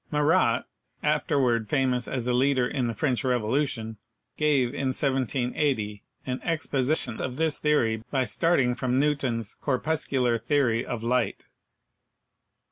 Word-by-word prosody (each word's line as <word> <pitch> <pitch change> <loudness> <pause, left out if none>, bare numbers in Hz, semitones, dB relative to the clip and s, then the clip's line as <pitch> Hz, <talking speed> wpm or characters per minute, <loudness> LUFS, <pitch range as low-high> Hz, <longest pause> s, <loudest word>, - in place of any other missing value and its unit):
Marat, 150 +1 +2 0.4
afterward 130 -7 +1
famous 130 -3 +1
as 125 -3 -3
a 125 - +1
leader 130 0 +2
in 125 -1 -1
the 115 - -3
French 130 +3 0
Revolution, 120 -2 -1 0.4
gave 145 -5 +2
in 140 +1 -3
1780 130 -4 -1 0.2
an 130 -1 -3
exposi 155 -3 0
tion 120 -4 -6
of 125 - -3
this 160 0 +2
theory 135 -7 +2
by 135 -1 +1
starting 130 +1 +2
from 125 +1 0
Newton's 130 -7 0
corpuscular 130 -3 0
theory 120 -1 +1
of 115 -2 -5
light. 125 +1 0
130 Hz, 125 wpm, -26 LUFS, 120-145 Hz, 0.4 s, Marat